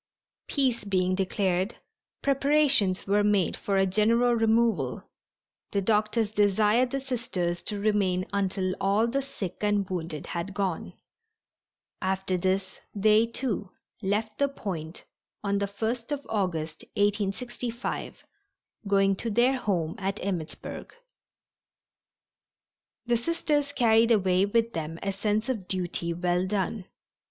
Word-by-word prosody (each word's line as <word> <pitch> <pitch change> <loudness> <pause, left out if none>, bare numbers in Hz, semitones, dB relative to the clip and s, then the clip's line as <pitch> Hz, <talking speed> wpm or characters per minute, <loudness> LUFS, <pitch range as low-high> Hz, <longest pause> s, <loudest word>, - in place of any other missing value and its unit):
Peace 260 -5 +1
being 185 -2 +1
declared, 190 +1 0 0.5
preparations 275 -8 +3
were 205 +1 +3
made 205 -4 +2
for 200 -1 -1
a 195 - +4
general 230 +5 +3
removal. 225 0 +2 0.7
The 200 - +2
doctors 215 +1 +1
desired 210 +4 +3
the 275 - -2
Sisters 210 -10 -2
to 205 -1 -4
remain 200 -3 +1
until 190 -1 0
all 200 +3 +3
the 260 +4 0
sick 210 -10 -6
and 205 -2 +1
wounded 165 -5 -4
had 175 +3 -4
gone. 190 -5 -2 1.1
After 190 0 0
this 190 +1 -1 0.2
they, 215 +2 +4
too, 230 -5 -1 0.3
left 210 +2 -1
the 280 - +4
Point 180 - -6 0.4
on 200 -1 +1
the 200 - 0
1st 230 +5 -3
of 285 -1 -3
August, 165 -7 -2 0.2
1865, 220 +4 -2 0.6
going 195 -1 +3
to 230 - -3
their 245 +5 +3
home 170 -8 -1
at 195 +1 -2
Emmittsburg. 180 - -5 2.1
The 240 0 +2
Sisters 295 +1 0
carried 230 -3 +4
away 190 -3 +3
with 230 +2 +1
them 160 0 -4
a 195 - 0
sense 210 +3 -1
of 220 -8 -3
duty 175 -2 -2
well 175 +1 0
done. 195 0 -2
205 Hz, 125 wpm, -27 LUFS, 185-230 Hz, 2.1 s, a